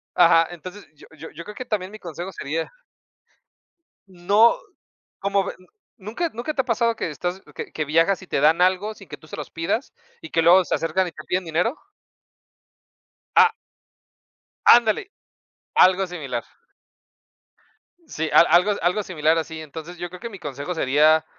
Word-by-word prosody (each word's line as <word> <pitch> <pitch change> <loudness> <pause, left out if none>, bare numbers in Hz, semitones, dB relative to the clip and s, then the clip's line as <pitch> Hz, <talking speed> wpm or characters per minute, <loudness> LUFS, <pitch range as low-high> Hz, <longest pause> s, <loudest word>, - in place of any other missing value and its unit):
ajá, 165 -1 +5
entonces, 180 +4 -10
yo - - -16
yo 160 +1 -10
yo 165 +3 -10
creo 210 - -9
que 255 - -6
también 200 -5 -3
mi 215 - -10
consejo 175 +2 -7
sería 160 -1 -4 1.4
no, 200 - +3 0.6
como 200 0 0
de - - -5
¿n 185 - -21 0.3
nunca 225 - -3
nunca 240 +7 -4
te 275 - 0
ha - - -21
pasado 230 0 +1
que 170 - -3
estás, 175 +5 -4
que - - -7
que 155 - -2
viajas 165 +6 +2
y - - -11
te 140 - -1
dan 155 +4 +4
algo 185 +4 +2
sin 195 -3 -15
que - - -8
tú 155 - -19
se - - -8
los 150 - -7
pidas, 165 +10 -3 0.3
y 160 - -10
que 165 - +1
luego 180 +3 +6
se - - -2
acercan 180 +3 0
y 170 - -10
te 155 - -11
piden 185 +1 -1
dinero? 175 - 0 1.6
Ah 450 - +6 1.1
Ándale, 240 - +5 0.6
algo 190 +1 +5
similar. 155 -9 -5 1.6
Sí, 160 - -3
al - - +8
algo, 180 +5 +4
algo 180 +4 +1
similar 160 -3 +1
así, 160 0 -4
entonces, 160 +3 -9
yo 175 +1 -5
creo 180 +1 -11
que 235 - -6
mi 200 -4 -11
consejo 145 +2 -5
sería, 155 +2 +3
180 Hz, 170 wpm, -23 LUFS, 160-200 Hz, 1.6 s, al